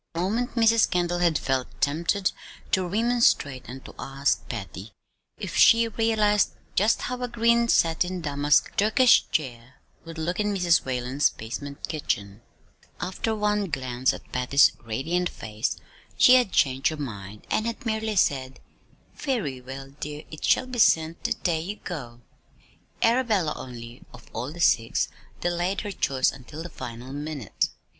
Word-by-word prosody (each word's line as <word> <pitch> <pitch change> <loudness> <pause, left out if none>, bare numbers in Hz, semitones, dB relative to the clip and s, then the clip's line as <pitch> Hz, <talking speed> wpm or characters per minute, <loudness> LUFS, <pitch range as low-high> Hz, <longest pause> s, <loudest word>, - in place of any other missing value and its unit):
For - - -2
a - - +1
moment 230 +7 -1
Mrs. 225 -1 +4
Kendall 175 -1 0
had 170 -3 +3
felt 130 -1 -1
tempted 170 +7 +1 0.4
to 185 -1 +2
remonstrate, 215 - +1
and 130 +2 -9
to - - -10
ask 140 +1 -1
Patty 100 -2 -7 0.4
if - - -6
she 230 0 +6
realized 215 -2 +2 0.2
just 210 +3 +2
how 250 0 -4
a 250 - -1
green 235 0 +2
satin 180 -1 +2
damask 145 -2 +1
Turkish 235 +5 +5
chair 125 -3 -3 0.3
would 165 0 -9
look 175 +4 -2
in 210 -1 0
Mrs. 175 -3 +3
Whalen's 130 +2 +1
basement 140 +6 -7
kitchen; 100 -9 -3 0.4
but - - -28 0.2
after 220 +4 -2
one 210 -2 0
glance 130 -3 0
at - - -10
Patty's 130 +3 +4
radiant 160 +11 -1
face, 110 +2 -4 0.4
she 250 - +7
had 250 -6 +4
changed 135 -3 +2
her 155 - -1
mind, 105 -7 -7
and 220 - +1
had 230 +1 -5
merely 220 -1 -1
said: 135 -7 +1 0.5
"Very 185 - -2
well, 135 +2 -9
dear. 150 0 -6
It 155 - -9
shall - - +3
be 255 -1 -6
sent 160 -5 +3
the - - +2
day 165 -2 -1
you 195 +5 -5
go." 125 - -8 0.8
Arabella 225 -9 +2
only, 120 -1 -9
of 120 - -17
all 120 +5 -4
the 170 +2 -7
six, 115 -7 +2 0.3
delayed 175 +2 -1
her 205 - -5
choice 135 -8 +1
until 145 +5 -9
the 175 - -7
final 125 -1 -8
minute. 145 -6 -3
160 Hz, 155 wpm, -25 LUFS, 130-210 Hz, 0.8 s, she